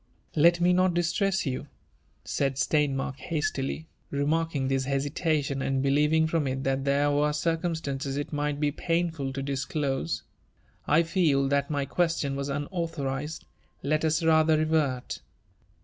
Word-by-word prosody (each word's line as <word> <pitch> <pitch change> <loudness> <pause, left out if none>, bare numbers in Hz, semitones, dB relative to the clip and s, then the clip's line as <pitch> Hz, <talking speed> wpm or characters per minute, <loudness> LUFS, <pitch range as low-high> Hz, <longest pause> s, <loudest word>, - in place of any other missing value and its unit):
*' - - -30
Let 170 0 +6
pie 175 +1 +4
not 180 0 +3
distreiis 190 +3 +1
you/' 130 -2 -3 0.8
«aid 135 -1 +1
Steinmark 135 -1 0
hastily, 150 0 -2 0.2
reaiarUn^ 145 0 0
^is 135 -1 +1
hesitation, 140 0 0
and 135 0 0
beUevipg 150 +3 +3
from 155 -3 0
it 130 0 -2
that 135 0 0
there 140 +1 +2
were 145 +1 +2
circumptanc^i 150 -3 -2
it 145 +2 -4
might 145 0 -1
be 150 -1 +1
painful 165 -3 -1
to 135 0 -4
disclose. 135 - -2 0.3
'* - - -36
I 165 - +5
feel 160 -5 +2
that 140 0 +1
my 145 -2 -1
question 160 -3 0
was 140 0 -3
upautborii^d. 150 -1 -3 0.4
Let 155 +3 +1
us 160 +1 +1
rather 160 -1 +4
revert." 155 -5 0
145 Hz, 145 wpm, -27 LUFS, 140-160 Hz, 0.8 s, Let